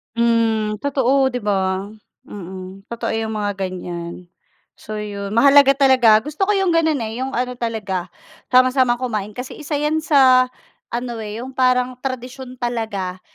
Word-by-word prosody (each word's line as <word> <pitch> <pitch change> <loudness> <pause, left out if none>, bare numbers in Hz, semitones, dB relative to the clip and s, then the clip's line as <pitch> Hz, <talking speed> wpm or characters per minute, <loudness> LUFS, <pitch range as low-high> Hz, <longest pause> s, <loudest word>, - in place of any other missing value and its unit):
Mhm. 225 -2 +1
Totoo 265 0 +1
'di 250 - -3
'ba. 190 -1 -1 0.4
Mhm. 190 0 -9
Totoo 235 0 -4
yung 220 0 -3
mga 205 -2 -2
ganyan. 175 -1 -7 0.5
So, 215 0 -7
'yon 200 -1 -5
mahalaga 275 +3 +6
talaga 255 -6 +6
gusto 300 - -2
ko - - +4
yung 385 -2 +1
ganun 320 -2 +2
eh 225 +2 -4
yung 265 - -2
ano 250 +1 -1
talaga 210 -7 -3 0.4
sama-samang 255 -1 +4
kumain 215 -5 -3
kasi 250 +4 -7
isa 295 0 -2
yan 300 +2 0
sa 260 -4 +5 0.4
ano 240 0 -3
eh 210 0 -6
yung 260 +2 -8
parang 255 -1 +2
tradisyon 255 0 -6
talaga 215 -7 -3
235 Hz, 150 wpm, -20 LUFS, 210-260 Hz, 0.5 s, mahalaga